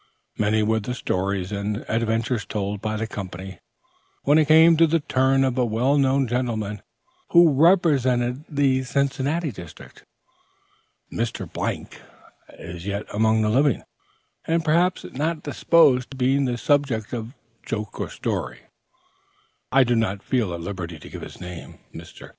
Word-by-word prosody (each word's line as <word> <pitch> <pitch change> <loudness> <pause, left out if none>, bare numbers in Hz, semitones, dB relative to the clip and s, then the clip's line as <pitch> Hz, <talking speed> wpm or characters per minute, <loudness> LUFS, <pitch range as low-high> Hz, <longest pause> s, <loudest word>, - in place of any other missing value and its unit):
Many 110 +1 +1
were 110 +1 +1
the 125 +4 -4
stories 95 -3 -2
and 105 +1 -3
adventures 115 0 0
told 100 +2 -4
by 110 0 -2
the 110 - -2
company, 95 -2 -7 0.6
when 145 +3 +4
it 155 - +2
came 160 +2 +7
to 165 +1 +5
the 165 +1 +2
turn 135 -1 +2
of 130 -1 0
a - - +3
well 120 +5 +1
known 135 0 +2
gentleman 110 -4 -2 0.5
who 170 -3 +7
represented 135 -6 +3
the 140 -3 +2
Cincinnati 140 +4 -1
district. 90 -6 -12 1.1
As 115 -1 -1
Mr. - - -5 0.6
is 85 +2 -8
yet 100 +1 -3
among 110 +1 +2
the 105 - +1
living, 135 +3 +2 0.6
and 165 0 0
perhaps 175 +4 +2
not 155 +4 -3
disposed 140 -7 +3
to 135 - -10
be 135 +2 +2
the 125 -2 -1
subject 130 -6 0
of 120 +2 -5 0.3
joke 105 -2 -5
or - - -3
story, - - -4 1.1
I 135 0 +5
do 120 -1 +1
not 100 -3 -1
feel 120 -8 0
at 85 - -7
liberty 85 -2 -6
to - - -12
give - - -8
his - - -10
name. 90 -2 -9 0.2
Mr. - - -11
120 Hz, 150 wpm, -23 LUFS, 105-140 Hz, 1.1 s, came